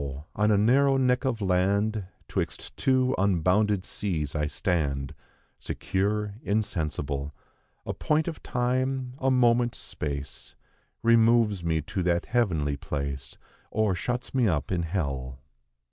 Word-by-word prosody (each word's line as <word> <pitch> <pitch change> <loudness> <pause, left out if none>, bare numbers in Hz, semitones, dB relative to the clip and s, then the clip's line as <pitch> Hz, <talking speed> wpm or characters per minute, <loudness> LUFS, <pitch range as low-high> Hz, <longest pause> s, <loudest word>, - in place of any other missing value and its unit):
on 105 -1 +2
a 105 - +4
narrow 135 +6 +4
neck 125 0 +2
of 120 -4 -1
land, 100 +3 +1 0.2
'Twixt - - -4
two 130 -1 +2
unbounded 95 +1 +2
seas 80 -8 -2
I 75 -2 0
stand, 70 -5 -1 0.5
Secure, 105 +2 -1
insensible; 75 -9 -2 0.5
A - - -2
point 155 0 +1
of 165 - -4
time, 130 +1 -1
a 135 - +2
moment's 120 -2 +3
space, 70 -2 -5 0.5
Removes 115 -4 +4
me 80 -2 0
to 95 - -3
that 85 -1 +1
heavenly 80 - +1
place, 70 -2 -4 0.3
Or 110 -3 +1
shuts 120 +7 -3
me 125 -4 +3
up 80 -5 0
in 90 -2 +1
hell." 70 -7 -3
100 Hz, 125 wpm, -27 LUFS, 80-120 Hz, 0.5 s, a